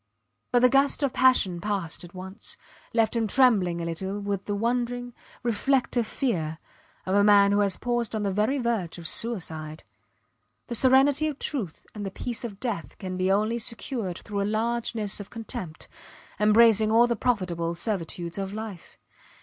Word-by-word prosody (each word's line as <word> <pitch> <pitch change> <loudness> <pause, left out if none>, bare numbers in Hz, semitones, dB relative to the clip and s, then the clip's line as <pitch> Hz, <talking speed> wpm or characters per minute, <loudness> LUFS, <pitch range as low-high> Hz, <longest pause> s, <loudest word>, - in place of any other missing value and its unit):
But 245 0 +3
the 250 - +7
gust 275 +2 +3
of 275 - +1
passion 200 -9 +3
passed 195 -6 -2
at 175 +1 -12
once, 190 +3 -8 0.3
left 225 0 +2
him 225 -1 +1
trembling 205 -9 +3
a - - -3
little, 190 +4 -3
with 200 -1 -3
the 205 - -2
wondering, 245 +2 -1 0.3
reflective 240 0 +1
fear 165 - -2 0.5
of 185 - -1
a 200 0 +5
man 200 -1 +6
who 205 - +3
has 200 -2 +1
paused 240 -2 -1
on 215 - -1
the 200 - 0
very 215 +8 +1
verge 230 -10 -1
of 170 -2 -4
suicide. 160 -9 -3 0.9
The - - -2
serenity 270 +5 +4
of 295 -3 -4
truth 225 - -3
and 210 - -6
the 195 - -3
peace 235 +4 -4
of 205 -4 -6
death 220 -10 -4
can 185 -2 -5
be 185 +1 +1
only 215 +4 +1
secured 225 -5 -3
through 205 -2 -4
a - - +1
largeness 225 -2 -1
of 205 - -8
contempt 190 -8 -7 0.5
embracing 215 0 +5
all 230 +2 +6
the 240 -1 0
profitable 180 -8 -1
servitudes 175 -2 -3
of 195 0 -4
life. 215 -5 -8
210 Hz, 170 wpm, -26 LUFS, 190-240 Hz, 0.9 s, the